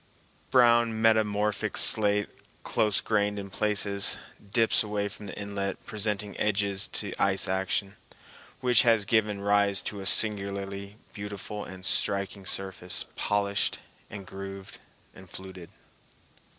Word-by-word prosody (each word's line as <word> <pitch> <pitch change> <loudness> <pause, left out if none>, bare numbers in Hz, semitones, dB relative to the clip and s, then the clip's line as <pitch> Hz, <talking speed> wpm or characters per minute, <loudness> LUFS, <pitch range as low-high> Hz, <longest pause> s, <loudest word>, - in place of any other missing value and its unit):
Brown 120 -3 +4
metamorphic 105 -2 +1
slate, 105 -1 +5 0.4
close 105 -2 +1
grained 105 -1 0
in 100 -1 -7
places, 100 -1 +3 0.3
dips 115 0 +3
away 105 -1 -2
from 100 0 -9
the - - -8
inlet, 100 -1 -5
presenting 105 -1 -3
edges 100 -2 0
to - - -4
ice 95 -1 +1
action, 95 +1 -2 0.6
which 125 -2 +5
has 115 -3 +3
given 105 -2 +1
rise 100 0 +2
to 105 - -3
a 95 - -4
singularly 100 -1 0 0.2
beautiful 100 0 -6
and 95 0 -10
striking 100 -1 0
surface, 95 -2 -1
polished 100 -1 0 0.3
and 100 -1 -9
grooved 95 0 -9 0.3
and 95 -2 -15
fluted. 95 -2 -9
100 Hz, 120 wpm, -27 LUFS, 100-105 Hz, 0.6 s, slate